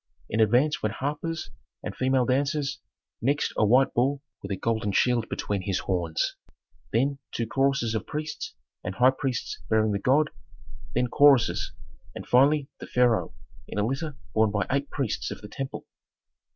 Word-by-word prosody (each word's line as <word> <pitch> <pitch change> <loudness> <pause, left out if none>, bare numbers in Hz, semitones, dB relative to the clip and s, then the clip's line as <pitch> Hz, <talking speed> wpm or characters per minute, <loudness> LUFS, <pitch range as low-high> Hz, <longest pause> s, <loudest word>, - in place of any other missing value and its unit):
In 110 - 0
advance 120 +8 +3
went 110 0 -1
harpers 150 +4 -3 0.3
and - - -5
female 130 -1 +2
dancers, 140 +2 0 0.4
next 140 +4 +1
a - - +2
white 125 +6 +4
bull 135 +3 +1 0.2
with 100 - -7
a 100 - -1
golden 110 0 -1
shield 120 +2 +2
between 100 -2 -2
his 95 -1 -1
horns, 85 -4 -1 0.6
then 135 +4 +1
two 115 - -2
choruses 135 -2 +1
of 110 - -3
priests 150 0 -5 0.3
and 95 - -4
high 125 +4 +6
priests 130 -6 -3
bearing 110 -1 +3
the 100 - 0
god, 145 +8 +3 0.6
then 125 +1 +3
choruses, 140 0 +4 0.4
and - - -7
finally 140 +3 +4
the - - -8
pharaoh 125 -2 +2 0.3
in - - -7
a 105 - +2
litter 140 +4 -3 0.2
borne 110 -1 +4
by 100 -2 0
eight 140 +1 0
priests 135 -7 -2
of - - -7
the 105 - -8
temple. 135 +6 -6
125 Hz, 165 wpm, -27 LUFS, 110-140 Hz, 0.6 s, high